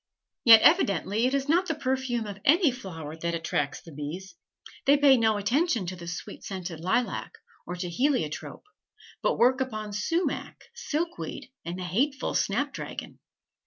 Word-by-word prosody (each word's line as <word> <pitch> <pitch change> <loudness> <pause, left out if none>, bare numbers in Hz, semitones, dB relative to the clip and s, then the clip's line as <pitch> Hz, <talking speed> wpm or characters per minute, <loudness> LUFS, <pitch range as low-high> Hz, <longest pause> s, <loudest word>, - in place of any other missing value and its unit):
Yet 225 -2 +9
evidently 225 - +3
it 265 - 0
is 275 0 -1
not 350 +4 +3
the 320 - -1
perfume 260 -4 -1
of 205 -1 -7
any 320 0 +5
flower 165 - -8
that 170 +1 -2
attracts 145 -3 -2
the 165 - -12
bees; 155 - -7 0.5
they 285 +1 +7
pay 280 -2 +6
no 220 -3 +2
attention 235 - +1
to 185 +1 -4
the 170 -1 -10
sweet 175 - -7
scented 180 -4 -6
lilac, 190 +8 -1 0.3
or 180 - -4
to 180 0 -4
heliotrope, 175 - -1 0.6
but - - +1
work 260 +2 +4
upon 215 -5 -3
sumach, 330 - -1 0.2
silkweed, 325 - -4
and 170 +2 -5
the 185 - -5
hateful 260 - 0
snapdragon. 270 +8 -2
225 Hz, 155 wpm, -27 LUFS, 180-275 Hz, 0.6 s, Yet